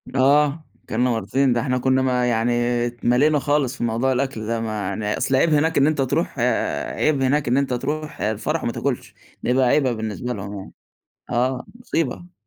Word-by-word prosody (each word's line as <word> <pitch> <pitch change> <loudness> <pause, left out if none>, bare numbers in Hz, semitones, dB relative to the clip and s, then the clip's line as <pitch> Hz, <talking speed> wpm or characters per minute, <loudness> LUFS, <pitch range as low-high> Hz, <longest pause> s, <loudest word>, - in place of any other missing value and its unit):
آه، 145 +3 +3 0.2
أكلنا 125 +3 0
مرّتين، 125 +3 +1
ده 120 - 0
إحنا 125 -2 0
كنا 130 +1 +2
ما 125 -1 +1
يعني 115 +1 +1 0.4
اتْمليْنا 125 +5 +2
خالص 145 -2 0
في - - -4
موضوع 120 +3 +1
الأكل 130 -4 -2
ده، 115 0 -1
ما 110 -3 -3
يعني 105 +2 -2
أصل 135 - +1
عيْب 155 +4 +3
هناك 160 +2 +2
إن 140 +1 +5
أنت 150 -3 +1
تروح 130 - -1
آآ، - - 0
عيْب 145 -3 +1
هناك 140 +2 +1
إن 125 +3 +2
أنت 135 -2 0
تروح 150 +5 -4
آآ، 105 +1 +1
الفرح 150 +10 -2
وما 115 - 0
تاكُلش، 135 0 -3 0.3
ده - - -1
يبقى 130 0 +3
عيْبة 130 -1 +3
بالنسبة 110 +3 -4
لهم 100 0 -6
يعني - - -11 0.6
آه، 125 +1 0
مُصيبة. 175 - -3
130 Hz, 190 wpm, -22 LUFS, 120-145 Hz, 0.6 s, إن